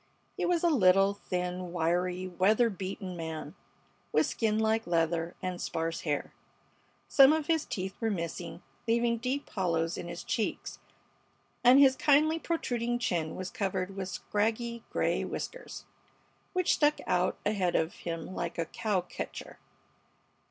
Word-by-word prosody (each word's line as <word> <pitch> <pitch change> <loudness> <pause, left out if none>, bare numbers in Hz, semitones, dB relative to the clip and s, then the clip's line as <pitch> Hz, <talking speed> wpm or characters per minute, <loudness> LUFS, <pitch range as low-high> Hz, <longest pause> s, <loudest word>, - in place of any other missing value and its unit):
He - - -1
was 350 -1 +1
a 345 - +5
little, 195 - +5
thin, 180 -2 -3
wiry, 180 +2 0
weather 210 +6 +3
beaten 190 -1 -5
man, 160 -2 -5 0.6
with 155 - +3
skin 215 -2 0
like 220 -1 +1
leather 165 0 0
and 185 -1 -3
sparse 165 0 -2
hair. 145 -3 -2 0.7
Some 270 0 +7
of 315 -1 +1
his 320 -1 +1
teeth 190 0 -4
were 225 - +1
missing, 170 -2 -4 0.2
leaving 235 0 +2
deep 260 +4 -2
hollows 165 -4 0
in - - -6
his 170 0 -6
cheeks, 220 - -2 0.8
and 250 +2 +8
his 270 -2 +7
kindly 310 +3 +4
protruding 240 -8 -1
chin 170 -9 -1
was 185 +1 -5
covered 190 -1 -2
with 190 -1 -4
scraggy 225 +4 -1
gray - - 0
whiskers, - - -6 0.7
which 365 -2 +2
stuck 295 0 +3
out 180 0 +1
ahead 195 -4 +1
of 160 +1 +1
him 165 +1 -5
like - - -4
a 165 - 0
cow 200 +2 -1
catcher. 180 - -7
190 Hz, 145 wpm, -30 LUFS, 175-235 Hz, 0.8 s, and